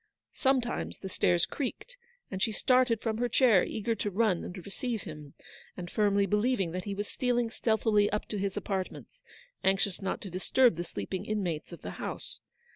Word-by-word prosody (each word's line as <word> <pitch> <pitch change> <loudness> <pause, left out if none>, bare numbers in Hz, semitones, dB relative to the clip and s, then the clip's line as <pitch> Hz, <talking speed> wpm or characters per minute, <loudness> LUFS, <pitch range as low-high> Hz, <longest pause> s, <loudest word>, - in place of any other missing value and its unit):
Sometimes 260 -3 0
the 190 - -7
stairs 175 -1 +2
creaked, 300 - -5 0.4
and 190 -1 -4
she 220 - +2
started 250 0 +3
from 220 -2 -1
her 245 0 +1
chair, 235 -9 +5
eager 225 +2 -1
to 210 - -2
run 200 -3 +2
and 185 - -7
receive 225 +2 -3
him, 150 -4 -9 0.4
and 175 -1 -6
firmly 200 -1 +3
believing 210 -2 +1
that 180 +1 -4
he 200 -1 -3
was 205 +1 -3
stealing 245 -2 0
stealthily 220 -3 +2
up 210 - -1
to 210 - -2
his 195 0 -1
apart 190 -2 -1
ments, - - -13 0.4
anxious 195 -1 +1
not 190 - -2
to 195 - -7
disturb 240 +7 +4
the 170 +1 -3
sleeping 170 - -4
in 215 -1 0
mates 165 -3 -3
of 170 - -10
the 90 - -4
house. - - -5
205 Hz, 190 wpm, -30 LUFS, 185-230 Hz, 0.4 s, chair